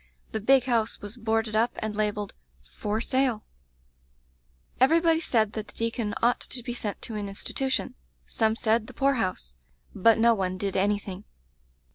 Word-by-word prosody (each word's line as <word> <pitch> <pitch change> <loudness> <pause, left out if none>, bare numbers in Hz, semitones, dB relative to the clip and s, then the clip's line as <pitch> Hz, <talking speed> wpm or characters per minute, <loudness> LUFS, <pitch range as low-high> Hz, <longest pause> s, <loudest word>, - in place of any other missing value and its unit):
The 220 - -2
big 265 +4 +5
house 230 -3 0
was 205 +2 -6
boarded 225 -2 -1
up 230 +2 +2
and 215 -1 -4
labelled 210 -1 -1 0.3
'For 210 - -3
Sale/ 255 -4 +1 1.3
"Everybody 325 +5 +4
said 220 -9 +1
that 215 -1 -5
the - - -14
deacon 230 -2 -2
ought 240 +1 +4
to 245 - -2
be 240 - -4
sent 210 -4 -4
to 230 - -2
an 210 -1 -3
institution; 260 +6 -2 0.3
some 220 -1 +1
said 225 -1 +1
the - - -12
poor 275 0 +3
house; 185 - -2 0.4
but 220 +3 +4
no 230 +1 +5
one 185 -3 -2
did 195 0 -3
anything. 200 0 -1
220 Hz, 160 wpm, -27 LUFS, 205-240 Hz, 1.3 s, big